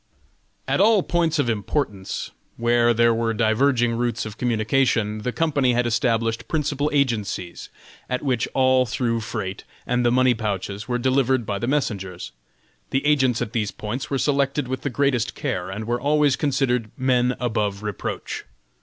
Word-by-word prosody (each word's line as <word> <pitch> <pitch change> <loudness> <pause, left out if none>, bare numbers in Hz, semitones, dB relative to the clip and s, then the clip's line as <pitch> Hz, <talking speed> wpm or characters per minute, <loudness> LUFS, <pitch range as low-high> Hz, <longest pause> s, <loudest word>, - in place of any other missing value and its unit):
At - - +2
all 210 -2 +5
points 165 -2 +1
of 145 -4 +1
importance, 105 -3 -2 0.3
where 120 0 +3
there 115 0 +4
were 115 0 0
diverging 120 +2 +2
routes 120 -1 -1
of 105 -1 -7
communication, 115 -2 +1
the 125 +4 -2
company 140 -2 +1
had 120 0 +1
established 115 -1 0
principal 150 -2 0
agencies, 110 -10 -1 0.4
at 125 +2 -2
which 125 -5 0
all 130 -1 +4
through 115 0 -1
freight 110 -4 -5 0.2
and 125 0 +1
the 120 - +4
money 130 0 +4
pouches 105 -2 -4
were 120 -1 0
delivered 130 -1 +1
by 100 -1 -2
the 120 - -2
messengers. 100 -10 -2 0.6
The 135 +2 -1
agents 130 -5 +3
at 110 - -8
these 105 -4 0
points 115 +7 -5
were 140 - 0
selected 140 0 +1
with 130 0 -3
the 140 - -2
greatest 130 -3 0
care, 110 -11 -3
and 105 +3 -5
were 120 +2 -1
always 145 -1 +3
considered 130 -6 0
men 125 -1 +2
above 105 -4 -1
reproach. 105 -3 -4
120 Hz, 160 wpm, -23 LUFS, 110-135 Hz, 0.6 s, all